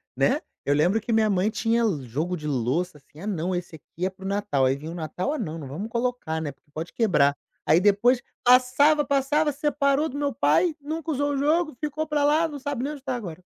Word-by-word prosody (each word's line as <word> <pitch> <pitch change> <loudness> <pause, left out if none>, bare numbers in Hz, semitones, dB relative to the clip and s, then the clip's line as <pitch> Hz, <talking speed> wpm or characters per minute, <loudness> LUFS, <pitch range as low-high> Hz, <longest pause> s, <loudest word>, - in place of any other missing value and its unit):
né. - - +2 0.3
Eu 145 - +3
lembro 180 +9 +2
que 230 - -4
minha 220 -1 +3
mãe 195 +2 +2
tinha 230 +1 +1 0.2
jogo 155 +9 -2
de 150 - -6
louça 150 +6 -1
assim: 145 - -19
"Ah 195 - -6
não, 185 -2 -1
esse 175 -2 -4
aqui 165 +4 -6
é - - +1
para 190 0 -15
o - - -4
Natal". 200 -9 +1
Aí, 130 +1 +2
vinha 155 +3 -7
o - - -7
Natal: 175 - -3
"Ah, 310 - -2
não, 165 -8 -4
não 145 -4 -7
vamos 185 +12 -5
colocar, 235 -9 -2
né, 150 -2 -3
porque 145 +2 -38
pode 160 +3 -6
quebrar". 145 -11 +3 0.3
Aí 160 +3 +5
depois 220 +5 +4 0.2
passava, 255 +5 +5
passava 290 +2 +2
separou 290 0 +1
do 280 - -6
meu 285 -1 -1
pai. 315 - +3
Nunca 315 +2 -4
usou 285 +1 0
o 275 - -1
jogo, 310 +2 +1
ficou 305 +1 -3
pra 295 -1 +1
lá, 310 +3 +3
não 295 -2 -7
sabe 275 -2 -3
nem 295 +2 -2
onde 280 - -11
tá 265 -2 -2
agora. 185 -7 -7
220 Hz, 235 wpm, -25 LUFS, -, 0.3 s, Aí